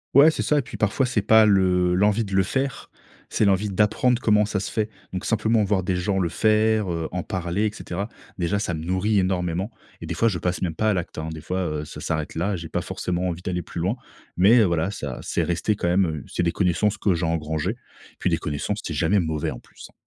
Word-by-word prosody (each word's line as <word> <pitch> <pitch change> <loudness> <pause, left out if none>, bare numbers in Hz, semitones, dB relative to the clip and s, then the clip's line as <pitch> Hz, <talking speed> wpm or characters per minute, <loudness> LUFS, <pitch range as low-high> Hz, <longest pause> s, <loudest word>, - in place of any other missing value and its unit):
Ouais, 145 +3 +9
c'est 160 - -2
ça 150 -1 +2
et - - +1
puis - - -9
parfois, 110 +5 +1
c'est 115 -5 0
pas 110 +1 +6
le 90 -2 +3
l'envie 105 +4 +3
de 100 -2 -4
le 95 - +4
faire. 135 +7 -3 0.4
C'est - - +1
l'envie 100 +1 +2
d'apprendre 115 +5 +2
comment 105 -2 +4
ça 105 -1 -2
se - - -4
fait, 110 -1 -1 0.2
donc 95 -1 -4
simplement 110 0 +2
voir 100 -1 +1
des 90 0 -1
gens 95 +2 0
le 85 -2 +1
faire, 110 +1 +2
heu, 85 -1 -2
en 90 -2 -3
parler 90 +4 -2
et 105 - 0
cetera, 100 0 -5 0.3
déjà, 95 +3 0
ça 90 -5 -2
me 80 - -5
nourrit 95 +4 +1
énormément 95 +2 0 0.3
et - - -5
des 85 - -3
fois 115 +8 +2
je 95 -6 0
passe 90 +2 -2
même 85 -4 -2
pas 110 +5 +2
à - - +2
l'acte, 90 -3 -4
hein, 80 +1 -3
des 80 - -8
fois, 95 +4 -2 0.2
heu, - - -6
ça - - -9
s'arrête 80 -2 -3
là, 95 +5 0
j'ai 85 -2 -7
pas - - -1
forcément 90 0 -2
envie 90 -1 -4
d'aller 90 -1 -3
plus - - -7
loin 95 +7 0 0.4
mais 105 +7 +6
heu, 110 - +5
voilà, 85 +1 0
ça 70 -10 -5
c'est - - -1
resté 85 +5 0
quand 85 - -2
même, 90 +2 +3
heu, 80 -4 -4
c'est - - -2
des 85 - +2
connaissances 100 +4 +1
que 95 -4 +2
j'ai 85 +1 -1
engrangées 80 +2 -1
et 120 - -17
puis - - +1
des - - +2
connaissances, 75 +8 -3
c'est 80 - -4
jamais 85 +7 +2
mauvais 80 -4 -1
en - - -6
plus, - - -14
hein. - - -25
95 Hz, 255 wpm, -24 LUFS, 85-105 Hz, 0.4 s, Ouais